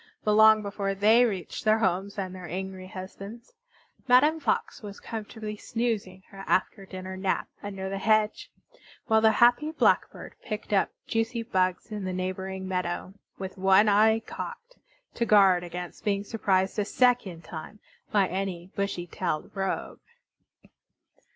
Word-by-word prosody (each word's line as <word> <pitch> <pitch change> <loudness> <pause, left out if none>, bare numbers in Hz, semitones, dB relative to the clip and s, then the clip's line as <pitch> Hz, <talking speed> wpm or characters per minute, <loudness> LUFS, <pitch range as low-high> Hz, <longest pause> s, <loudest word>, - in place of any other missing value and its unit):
But 210 - +2
long 220 0 +7
before 200 -1 -2
they 220 +5 +5
reached 190 -7 -4
their 215 0 +4
homes 195 -1 -1
and 190 -2 -3
their 185 -1 -8
angry 190 +1 -5
husbands 195 - -9 0.5
Madame 290 +6 +5
Fox 260 -8 -1
was 205 -2 -9
comfortably 215 -1 -6
snoozing 210 -5 -3
her 195 0 -9
after 195 +1 0
dinner 185 0 -7
nap 190 0 -1
under 195 -2 -5
the 195 0 -3
hedge; 215 +1 +1 0.6
while 220 -2 +3
the 220 0 +5
happy 245 +6 +4
Blackbird 320 - +1
picked 215 -1 -5
up 195 - +3 0.2
juicy 225 +1 -1
bugs 185 -3 -1
in 210 -2 -4
the 185 - -3
neighboring 190 +1 -4
meadow, 180 0 -3 0.2
with 190 0 -7
one 195 +2 +5
eye 220 +2 +4
cocked - - -8 0.4
to 235 - -1
guard 195 -4 +5
against 175 0 -7
being 200 -2 0
surprised 195 -2 0
a 205 - +1
second 225 -8 +1
time 160 +6 -8 0.3
by 200 -2 +4
any 185 -1 -4
bushy 200 -3 -2
tailed 155 -2 -3
rogue. 195 -1 -3
200 Hz, 145 wpm, -27 LUFS, 185-220 Hz, 0.6 s, long